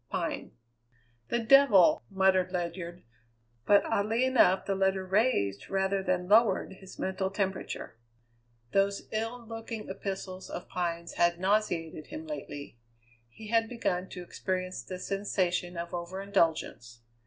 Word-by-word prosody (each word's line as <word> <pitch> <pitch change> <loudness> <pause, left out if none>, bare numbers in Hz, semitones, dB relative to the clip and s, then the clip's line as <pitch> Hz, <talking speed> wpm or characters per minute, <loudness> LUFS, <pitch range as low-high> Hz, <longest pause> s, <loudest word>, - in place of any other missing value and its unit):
Pine. - - -3 0.7
"The - - 0
devil!" 235 -6 +6
muttered 190 -2 +3
Ledyard; 175 -1 -4 0.6
but 205 0 +6
oddly 225 +5 +1
enough 210 -8 +4
the 200 - 0
letter 190 0 +1
raised, 185 - +1
rather 195 0 +1
than 180 -1 -1
lowered, 210 -2 +4
his 190 -1 -12
mental 190 0 -1
temperature. 190 - -3 0.7
Those 200 +2 +1
ill 225 +2 -3
looking 225 -1 -6
epistles 190 -1 -5
of 175 - -6
Pine's 170 -1 -3
had 175 0 +3
nauseated 180 -6 0
him 310 +2 -7
lately. 145 - -7 0.5
He 210 - -11
had 225 0 +2
begun 190 -6 -2
to 180 - -7
experience 185 +1 -3
the 185 - -7
sensation 185 -2 -1
of 170 +1 -5
over 175 +2 -4
indulgence. 165 - 0
190 Hz, 130 wpm, -30 LUFS, 180-210 Hz, 0.7 s, devil